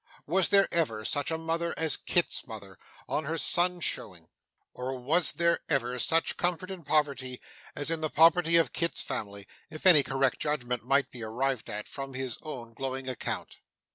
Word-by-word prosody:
Was 185 +4 +2
there 195 -1 +5
ever 115 -11 0
such 145 +4 0
a 160 - -1
mother 165 +1 -2
as 160 -1 +2
Kit's 175 -5 0
mother, 100 -5 -10 0.3
on 155 - -1
her 160 +3 -2
son's 175 +1 +3
showing; - - -3 0.4
or 130 +1 -4
was 155 +7 +1
there 170 0 +2
ever 125 -4 0
such 165 +6 +1
comfort 180 +1 -1
in 185 -3 -7
poverty 140 -4 0 0.4
as 145 +3 -1
in 165 -1 -1
the 155 - 0
poverty 165 +2 +4
of 165 - +2
Kit's 170 -1 -1
family, 100 -1 -5 0.2
if 155 +1 -10
any 175 -6 +8
correct 135 -1 0
judgment 125 -6 -2
might 135 +3 +1
be 120 - -10
arrived 125 +3 -2
at, 105 0 -5
from 135 -1 -7
his 130 -2 -4
own 120 -7 -8
glowing 135 +2 -4
account! 130 -3 -4
145 Hz, 175 wpm, -29 LUFS, 125-165 Hz, 0.4 s, any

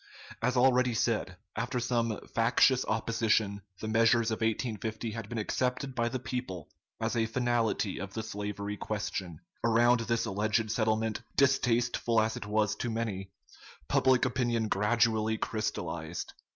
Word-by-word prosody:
As 125 +2 +1
already 125 -1 +4
said, - - 0 0.2
after 125 - -1
some 115 -2 0
factious 125 +2 +4
opposition 110 -2 +1 0.2
the 110 - -3
measures 115 +1 +3
of 110 - -1
1850 110 0 -2
had 110 -1 -6
been 120 - -4
accepted 125 +5 -1
by 120 -1 0
the 130 - -2
people 125 - -5 0.3
as - - -1
a 115 -1 +2
finality 115 -4 0
of 100 0 -6
the 110 - -2
slavery 105 -1 -4
question. 95 -6 -4 0.2
Around 120 +1 +4
this 115 0 0
alleged 110 +1 0
settlement, 110 -1 0 0.2
distasteful 120 -3 +2
as 110 +1 +1
it - - -6
was 105 0 +1
to 120 - -2
many, 110 -4 -3 0.6
public 130 -1 +3
opinion 120 -3 0
gradually 110 +1 +2
crystallized. 85 -8 -3
115 Hz, 140 wpm, -30 LUFS, 105-120 Hz, 0.6 s, already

